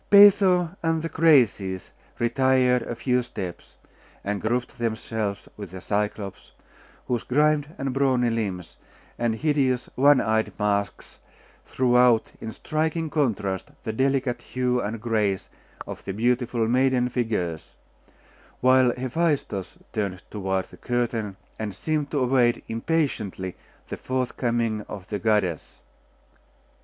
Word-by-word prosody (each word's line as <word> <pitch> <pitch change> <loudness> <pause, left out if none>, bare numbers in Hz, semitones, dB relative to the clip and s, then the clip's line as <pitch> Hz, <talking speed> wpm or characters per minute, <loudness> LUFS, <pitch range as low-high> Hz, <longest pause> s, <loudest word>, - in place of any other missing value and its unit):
Peitho 195 -4 +6
and 165 -1 0
the 165 - -2
Graces 120 - +3 0.3
retired 125 +1 +3
a 115 - -5
few 125 +1 +1
steps, 90 - -7 0.5
and 100 0 -2
grouped 120 +3 -2
themselves 110 -3 -3
with 100 -3 -7
the 95 +2 -8
Cyclops, 105 0 -3 0.5
whose 120 -2 0
grimed 150 +2 +2
and 135 -1 -2
brawny 130 -3 +2
limbs, 100 -6 -3 0.4
and 120 -2 +1
hideous 135 -2 +1
one 140 +1 +5
eyed 110 0 0
masks, 100 -1 -2 0.5
threw 125 -1 +1
out 125 -2 +4
in 110 - -5
striking 160 +4 -2
contrast 105 -10 -1
the 110 -3 -3
delicate 130 0 0
hue 125 -1 -1
and 110 +2 -3
grace 105 -4 -1 0.3
of - - -8
the 95 - -4
beautiful 120 +1 +1
maiden 125 +1 +3
figures; 95 - -2 0.8
while 130 0 +5
Hephaestus 130 - -1 0.2
turned 95 -4 -2
toward 95 -2 -1
the - - -16
curtain, 115 -5 -2 0.2
and 105 -3 -4
seemed 150 +5 -1
to 150 - -2
await 125 -2 +2
impatiently 115 - -2 0.3
the - - -4
forthcoming 120 -3 -1
of 95 -2 -8
the 105 - -2
goddess. 105 -6 0
120 Hz, 125 wpm, -25 LUFS, 105-130 Hz, 0.8 s, Peitho